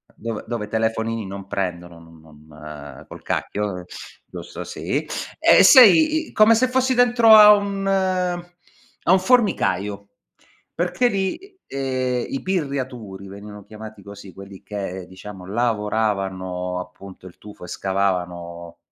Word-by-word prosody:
Dove 115 -1 -6
dove 115 -3 -4
telefonini 110 0 -2
non 100 0 -8
prendono, 90 -4 -5
non 80 -1 -17 0.3
non 75 -3 -11
col - - -11
cacchio, 100 -3 -3 0.4
giusto - - -9
sì. - - -4 0.3
E - - +6
sei 305 - +6
come 220 +1 +5
se 255 +3 +2
fossi 260 0 +1
dentro 240 -2 +5
a 210 0 +9
un 200 -1 -2
a 180 -2 -3
un 190 - +5
formicaio, 105 - 0 0.7
perché 180 +8 0
lì, 330 - -4
ehm, 130 -2 -2
i 135 - -4
pirriaturi 130 - -4
venivano 100 +1 -11
chiamati 110 -1 -11
così 100 -1 -12
quelli 100 0 -12
che 95 -3 -6
diciamo 95 0 -11
lavoravano 95 -5 -2
appunto 95 +1 -11
il 85 - -15
tufo 105 -3 -13
e - - -12
scavavano 90 -3 -3
105 Hz, 125 wpm, -21 LUFS, -, 0.7 s, a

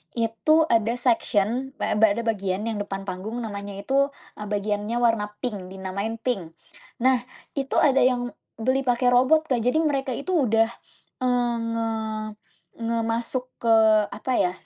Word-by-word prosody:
itu 235 +8 +3
ada 225 0 +3
section 240 +1 0
ba - - -1
eee, 220 +1 +6
ada 235 - -3
bagian 200 -3 -1
yang 225 -2 -2
depan 195 -1 -4
panggung. 195 +5 -5
Namanya 200 -2 -6
itu, 275 +3 +2 0.3
eee, 210 - -5
bagiannya 210 +2 -2
warna 225 -3 +2 0.2
pink, 205 -7 -3
dinamakan 190 +4 -4
pink. 185 -10 -2 0.5
Nah, 260 -1 +5 0.4
itu 270 -1 -3
ada 275 -2 +4
yang 245 -1 +2 0.2
beli 260 +4 0
pakai 245 0 +3
robot, 270 +5 +4
Kak. 245 - +3
Jadi 250 +8 +2
mereka 270 -4 0
itu 370 +7 -4 0.2
udah 225 +1 +4 0.6
eee, 245 -1 +2 0.2
nge 230 0 -1 1.0
nge 230 0 0
masuk 240 +2 -2
ke 230 - +1 0.4
apa 255 +5 -4
ya 180 - +2
230 Hz, 150 wpm, -24 LUFS, 210-255 Hz, 1.0 s, eee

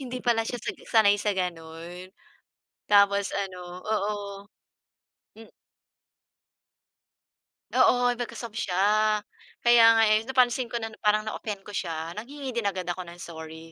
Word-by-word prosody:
hindi 255 -1 -6
pala 235 -2 +3
siya 245 - -3
sag - - -4
sanay 205 -3 +5
sa 205 -1 0
gano'n. 175 0 -5 0.8
Tapos 200 -1 +4
ano 190 -2 -4 0.2
oo. 210 -1 0 1.2
Hmm. 225 0 -14 2.2
Oo, 245 0 +4
naka-soft 235 -2 -6
siya. 180 - -2 0.9
Kaya 240 -1 +6
nga 225 - +5
eh, 215 - +5
napansin 255 -1 +2
ko 235 - -8
na 225 0 -5
parang 210 0 +2
na-offend 210 -2 -5
ko - - -10
siya. 165 -4 -4
Nanghingi 270 +4 -6
din 235 -4 -1
agad 185 -2 -2
ako 175 0 -4
ng 175 +1 -11
sorry. 160 0 -9
210 Hz, 130 wpm, -26 LUFS, 180-235 Hz, 2.2 s, Kaya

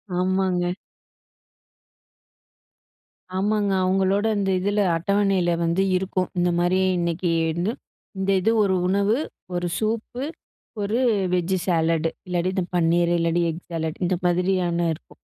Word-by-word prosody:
ஆமாங்க. 180 -1 +1 2.6
ஆமாங்க, 205 +1 +1
அவங்களோட 195 +2 +2
இந்த 195 -1 0
இதுல, 205 +2 +1 0.2
அட்டவனைல 195 -1 +1
வந்து 170 +3 +1
இருக்கும். 185 0 -1
இந்த 175 0 +2
மாரி 175 +1 +2 0.2
இன்னைக்குன்னு, 170 +2 0 0.5
இந்த 190 0 -2
இது 225 - +2
ஒரு 190 -2 +2
உணவு, 200 +3 +2 0.4
ஒரு 175 0 -1
சூப்பு, 225 +3 -2 0.6
ஒரு 210 +3 0 0.4
வெஜ்ஜு 180 +1 +1
சாலடு 165 -2 +1 0.2
இல்லாட்டி 180 0 0
இந்த 185 - +1
பன்னீரு, 170 0 +3
இல்லாட்டி 170 +1 +1
எக் 165 +2 -5
சாலட் 160 -1 -3
இந்த 180 +1 +1
மாதிரியான 175 -1 +1
இருக்கும். 155 - -15
180 Hz, 115 wpm, -23 LUFS, 170-195 Hz, 2.6 s, பன்னீரு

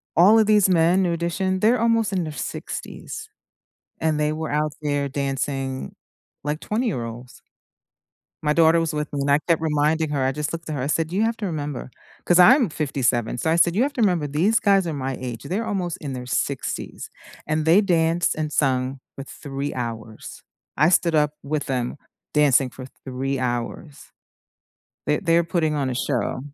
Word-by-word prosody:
all 195 +7 +7
of 220 - +5
these 210 -2 +4
men, 175 +1 +3
New 175 -2 +1
Addition, 185 +3 -1
they're 230 +3 +4
almost 230 -2 +2
in 185 -3 0
their 155 - -6
60s, 435 - -6 0.7
and 160 -1 +1
they 150 0 +1
were 160 0 -4
out 150 +1 0
there 145 -1 0
dancing 135 -1 -3 0.5
like 150 +2 -2
20-year-olds. 125 - -4 1.0
My 150 0 +2
daughter 165 0 +5
was 165 -1 -1
with 150 0 -3
me 145 -2 -2
and 140 +1 +1
I 145 - +5
kept 165 -2 +2
reminding 155 0 +1
her, 140 -3 0
I 130 - +2
just 150 +3 -3
looked 165 -1 -6
at 155 - -2
her, 135 - -3
I 135 - -1
said, 160 +1 0
"You 200 +4 +1
have 225 0 0
to 210 - -4
remember” 145 -6 -4 0.4
'cause 175 - +4
I'm 240 - +7
57. 130 -6 -1
So 140 - -1
I 160 - +3
said, 170 +1 +3
"You 225 - +2
have 285 +1 -1
to 255 - -2
remember 175 -7 +2
these 175 +11 +2
guys 195 -2 +3
are 165 - -2
my 135 -2 -3
age, 120 -3 -6
they're 215 +6 -2
almost 180 -5 -2
in 140 -3 -5
their 125 -1 -6
60s, 135 +1 -3 0.4
and 155 0 0
they 175 +6 +6
danced 170 -2 +1
and 155 -1 -3
sung 130 -1 0 0.2
for 135 - -6
3 140 0 -5
hours. 115 -3 -6 0.3
I 155 +4 +4
stood 170 -2 +3
up 150 -1 +2
with 145 0 -2
them 125 0 -2 0.4
dancing 140 -3 +4
for 130 +1 -10 0.2
3 135 +1 -2
hours." 125 +4 -4 1.0
They're 150 - +1
they're 170 -2 +3
putting 165 -2 0
on 140 -3 -1
a - - -2
show. 125 +1 -1
155 Hz, 190 wpm, -23 LUFS, 135-175 Hz, 1.0 s, all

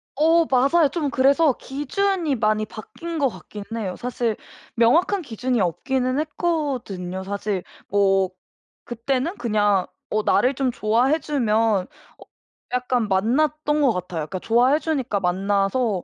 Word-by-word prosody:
어 325 +3 +4
맞아요. 275 +4 +3
좀 300 -4 -1
그래서 275 +2 +3
기준이 305 +4 -1
많이 215 -1 +1
바뀐 325 +10 -7
것 275 -3 +3
같기는 210 -2 -10
해요. 190 -5 -3
사실 240 -3 -2 0.4
명확한 330 - +3
기준이 250 -3 -2
없기는 255 - 0
했거든요. 270 - -2
사실 200 -1 -3 0.2
뭐 195 -2 +2 0.5
그때는 260 - -2
그냥 205 -4 +1 0.2
어 215 0 0
나를 260 +2 +2
좀 260 -1 0
좋아해 245 +8 +2
주면 225 -9 +1 0.3
어 - - -13 0.5
약간 250 -3 0
만났던 295 +9 +1
것 265 -5 +4
같아요. 180 -3 -4
그러니까 185 - -5
좋아해 245 - +3
주니까 265 -11 -1
만나서 195 +3 0
245 Hz, 285 characters per minute, -23 LUFS, 205-290 Hz, 0.5 s, 어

